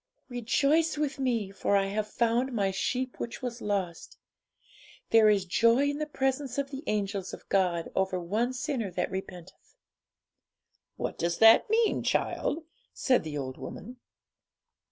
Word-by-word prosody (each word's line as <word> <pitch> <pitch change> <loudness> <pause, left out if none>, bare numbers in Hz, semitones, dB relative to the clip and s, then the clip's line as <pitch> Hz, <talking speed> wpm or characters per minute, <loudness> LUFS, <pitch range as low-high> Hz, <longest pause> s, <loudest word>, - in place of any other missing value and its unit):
'"Rejoice 280 +7 +1
with 295 -2 -2
Me; 235 -7 0
for 200 0 0
I 195 - +2
have 210 +2 -2
found 235 +4 +1
My 200 -4 +1
sheep 250 +6 -2
which 235 +3 -5
was 245 -1 -4
lost. 190 -5 -3 0.9
There 225 -1 +7
is 200 -3 +2
joy 230 +9 +3
in 290 - -5
the 305 - -2
presence 270 -2 -1
of 280 0 -2
the 275 +1 -6
angels 200 -2 -2
of - - -19
God 180 -4 +1
over 190 -1 0
one 215 +8 -1
sinner 255 -4 -2
that 180 +1 -2
repenteth."' 190 - -8 1.2
'What - - -4
does 170 0 0
that 225 - +7
mean, 450 0 +2
child?' 320 +2 -1 0.3
said 255 - +2
the 155 -2 -5
old 130 -2 -5
woman. 245 +4 -8
225 Hz, 150 wpm, -29 LUFS, 190-265 Hz, 1.2 s, There